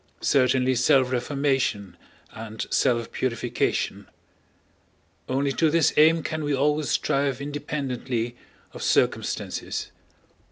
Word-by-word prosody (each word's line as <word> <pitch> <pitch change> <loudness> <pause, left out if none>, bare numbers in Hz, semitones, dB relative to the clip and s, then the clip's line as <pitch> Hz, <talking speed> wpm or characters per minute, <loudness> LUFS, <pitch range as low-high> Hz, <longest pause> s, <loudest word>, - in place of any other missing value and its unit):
Certainly 130 -1 +2
self 130 +1 +3
reformation 130 -7 -1 0.4
and 110 0 -6
self 120 -3 +1
purification. 120 -1 -2 1.2
Only 135 +2 0
to 160 +3 +2
this 165 0 +3
aim 160 +1 +5
can 155 -1 -3
we 145 -1 0
always 150 +2 +1
strive 140 -2 0
independently 135 -5 -3 0.4
of - - -9
circumstances. - - -1
135 Hz, 95 wpm, -25 LUFS, 125-145 Hz, 1.2 s, aim